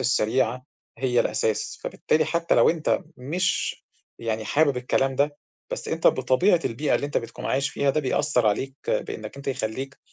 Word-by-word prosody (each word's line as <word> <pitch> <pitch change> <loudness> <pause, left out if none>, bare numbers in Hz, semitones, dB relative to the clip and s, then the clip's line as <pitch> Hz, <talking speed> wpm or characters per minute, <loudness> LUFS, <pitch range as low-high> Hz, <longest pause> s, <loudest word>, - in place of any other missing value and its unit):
السريعة 125 0 +1 0.3
هي 125 -2 +2
الأساس، 110 -2 -1
فبالتالي 155 0 +1
حتى 170 0 +1
لو - - +6
أنت 165 +2 0
مش 170 +8 -1 0.4
يعني 110 -1 -2
حابب 145 +3 +2
الكلام 135 +2 +1
ده 145 +1 +1 0.3
بس - - -4
أنت - - 0
بطبيعة 175 +7 +4
البيئة 140 +6 0
اللي 145 - 0
أنت 145 - 0
بتكون 115 - -9
عايش 140 +1 0
فيها 140 -1 +1
ده 155 - 0
بيأثّر 135 -3 +1
عليك 130 +6 0
بإنّك 110 +4 -3
أنت 140 - -6
يخلّيك 130 +2 -3
135 Hz, 160 wpm, -25 LUFS, 120-145 Hz, 0.4 s, لو